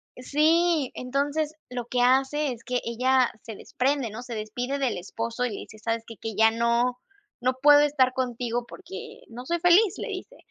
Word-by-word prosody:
Sí, 310 +2 +2
entonces, 290 +4 -2
lo 245 -2 -4
que 245 0 0
hace 270 +3 +2
es 240 0 -8
que 250 -1 -1
ella 250 +2 +2
se 220 -2 -8
desprende 260 0 -1
¿no? 220 +3 -7
Se 245 -2 -7
despide 245 +6 -3
del 265 -4 -1
esposo 230 +6 -3
y - - -1
le 205 - -5
dice: 215 - -12
"¿Sabes 225 +1 -2
qué? 230 - -9
Que 220 -3 -6
ya 220 +1 +5
no 235 +2 +1 0.4
no 255 +1 +1
puedo 290 0 +8
estar 270 -3 +3
contigo 245 -2 -2
porque 190 - -10
no 245 +2 -9
soy 340 +3 -1
feliz", 355 +4 +4
le - - -5
dice. 375 -2 -7
250 Hz, 190 wpm, -26 LUFS, 235-285 Hz, 0.4 s, puedo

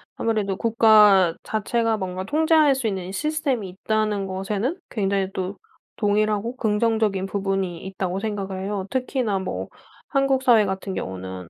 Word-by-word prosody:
아무래도 210 -4 -1
국가 210 -6 +5
자체가 225 +1 0
뭔가 185 -1 -4
통제할 310 +3 +3
수 260 -3 -2
있는 190 -4 -3
이 185 - -7
시스템이 280 - -1
있다는 210 +1 -1
것에는 200 - -2
굉장히 195 -3 0
또 190 +1 -4 0.4
동의를 210 0 +2
하고 230 +4 -3
긍정적인 215 -4 +1
부분이 195 -3 -2
있다고 190 0 -3
생각을 195 -3 -4
해요. 200 -1 -3
특히나 250 -5 -1
뭐 190 - -4 0.4
한국 275 -2 +1
사회 235 -5 +5
같은 190 0 -4
경우는 95 - -6
205 Hz, 340 characters per minute, -23 LUFS, 190-230 Hz, 0.4 s, 국가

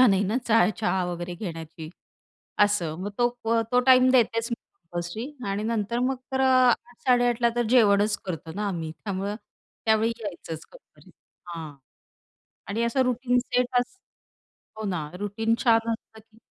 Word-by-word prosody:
मजा 255 - +8
नाही 195 -1 +3
ना 210 +5 0
चहा, 225 -5 +5
चहा 190 -4 +1
वगैरे 175 0 -4
घेण्याची 165 -4 -7 0.8
असं. 180 -7 0
मग 205 - -3
तो 240 0 +4 0.2
अ, 230 0 +3
तो 250 - +5
टाईम 255 0 +7
देतेच 230 -2 +2
मी - - +1
कंपल्सरी 175 - -7 0.2
आणि 200 +2 -1
नंतर 225 0 -1
मग 260 +1 +1 0.2
तर 265 - +1
अ, - - +4 0.4
08.00-08.30 245 -1 +1
ला 235 - +6
तर - - +2
अ, - - -3
जेवणच 210 -4 +4
करतो 165 -3 -5
ना 205 0 -2
आम्ही, 165 -4 -4
त्यामुळं 200 +1 -3 0.5
त्यावेळी 220 +1 +3
यायचंच 170 -6 -6
कंपनीत, - - -19 0.4
हां 165 -3 -7 0.9
आणि 220 +4 -1
असं 235 +3 +1
रुटीन 250 0 +1
सेट 250 0 0
अस 250 +10 -5 0.8
हो 220 - -4
ना, 155 -5 -3
रुटीन 220 +3 0
छान 230 -2 +3
असलं 220 0 -7
की 220 0 -24
220 Hz, 165 wpm, -26 LUFS, 185-240 Hz, 0.9 s, मजा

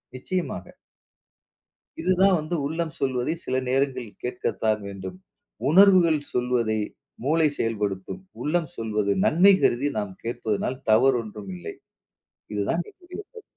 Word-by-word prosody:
நிச்சயமாக. 180 +8 -4 1.3
இதுதான் 190 - +4
வந்து 155 +3 -3
உள்ளம் 160 +2 -2
சொல்வதை 130 +1 0
சில 130 - -1
நேரங்களில் 130 -4 -1
கேட்கத்தான் 110 -3 -1
வேண்டும். 95 -2 -7 0.5
உணர்வுகள் 180 -2 +6
சொல்வதை 120 -3 +1 0.5
மூளை 160 +2 +4
செயல்படுத்தும். 105 - -2 0.2
உள்ளம் 160 0 0
சொல்வது 105 -2 0
நன்மை 190 +5 +6
கருதி 135 +5 +3
நாம் 100 -2 -4
கேட்பதனால் 115 +2 -2
தவறு 130 +4 +5
ஒன்றும் 105 -3 -8
இல்லை. 90 - -7 0.8
இதுதான் 105 +12 0
என்னுடைய 365 +1 -10
கருத்து. 445 +3 -14
130 Hz, 110 wpm, -25 LUFS, 110-165 Hz, 1.3 s, உணர்வுகள்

